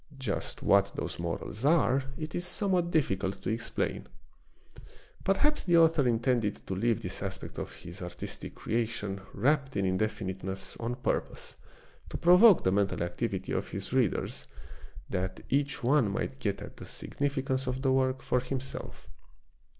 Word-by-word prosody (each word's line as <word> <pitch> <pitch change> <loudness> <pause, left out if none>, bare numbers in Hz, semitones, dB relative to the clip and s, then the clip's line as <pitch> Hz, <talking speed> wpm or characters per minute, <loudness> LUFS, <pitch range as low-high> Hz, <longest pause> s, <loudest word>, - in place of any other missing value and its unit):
Just 130 - -2
what 100 0 +4
those - - -4
morals 85 +6 -4
are 140 -3 +4
it 155 0 -5
is 175 - -1
somewhat 180 -1 +2
difficult 100 - +1
to - - 0
explain. 115 - -2 1.2
Perhaps 295 +11 +2
the 175 -2 +5
author 160 -5 +5
intended 115 -2 +2
to - - -3
leave 115 +3 +1
this 90 +1 -5
aspect 95 -1 -5
of - - -6
his 85 +2 -9
artistic 90 0 -6
creation 110 -4 -2
wrapt 135 +2 +1
in 100 - +1
indefiniteness 95 -1 -2
on 120 +1 -2
purpose 125 - -2 0.5
to - - -4
provoke 180 +4 +7
the 95 - +3
mental 100 -2 +1
activity 85 0 -3
of - - -1
his - - -4
readers, - - 0 0.6
that 95 0 -3
each 140 0 0
one 130 -3 +4
might 130 +7 -3
get 100 -6 -2
at - - -10
the - - -8
significance 135 -2 -2
of 130 +1 -2
the 135 - +3
work 130 0 +1
for 125 - +2
himself. 130 +1 -6
125 Hz, 150 wpm, -30 LUFS, 100-140 Hz, 1.2 s, provoke